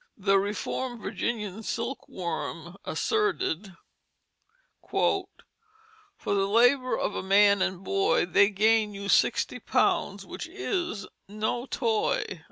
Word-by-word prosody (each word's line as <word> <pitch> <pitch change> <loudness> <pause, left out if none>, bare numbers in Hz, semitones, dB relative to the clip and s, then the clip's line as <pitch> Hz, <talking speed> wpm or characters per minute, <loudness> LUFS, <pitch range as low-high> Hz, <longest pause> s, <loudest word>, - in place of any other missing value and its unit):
The 195 -1 +3
Reformed 230 +5 -3
Virginia 210 -2 -3
Silk 235 +4 -4
Worm 170 -1 -5
asserted: 210 - -1 1.1
"For 385 -1 +1 1.0
the 195 -1 +1
Labour 245 +5 +3
of - - -1
a - - -3
man 200 +1 +4
and 190 -1 -1
boy 390 - +2
They 200 - +4
gain 215 +1 +2
you 200 0 -6
Sixty - - +2
pounds - - 0
which - - -7
is 355 - -3 0.2
no 215 +5 -2
toy." 220 -7 -1
210 Hz, 110 wpm, -27 LUFS, 195-250 Hz, 1.1 s, man